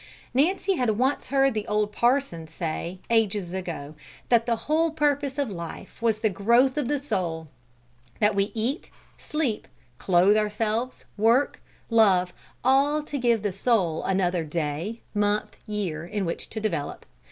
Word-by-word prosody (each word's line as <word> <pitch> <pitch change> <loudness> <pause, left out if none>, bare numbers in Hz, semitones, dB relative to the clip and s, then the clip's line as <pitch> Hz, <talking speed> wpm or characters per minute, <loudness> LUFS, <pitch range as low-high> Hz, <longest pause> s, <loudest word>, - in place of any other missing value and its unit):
Nancy 365 +7 +2
had 225 -5 +1
once 265 +4 0
heard 270 -1 +3
the 215 -1 -3
old 210 0 0
parson 235 - +1
say, 170 +2 -4
ages 205 -5 +1
ago, 170 -6 -5 0.4
that 235 -1 +4
the 235 - +2
whole 320 +2 +2
purpose 290 -3 0
of 280 -6 -1
life 170 +4 -8
was 220 -2 +1
the 220 - +3
growth 235 +7 +3
of 295 -5 -1
the 290 +2 +1
soul; 170 - -3 0.7
that 210 0 +3
we 195 0 +2
eat, 240 +8 -2 0.3
sleep, 290 -9 -2 0.3
clothe 185 +3 +4
ourselves, 215 +3 -1
work, 230 +6 +3 0.3
love, 190 -6 +4 0.3
all 280 +4 +3
to 290 -1 -4
give 235 -3 +2
the 205 - 0
soul 190 -5 +1
another 180 -3 +1
day, 160 +7 -3
month, 205 0 0
year, 190 -7 -3
in 195 +3 -3
which 170 - -4
to 220 - -4
develop. 170 -10 -3
215 Hz, 150 wpm, -26 LUFS, 185-260 Hz, 0.7 s, that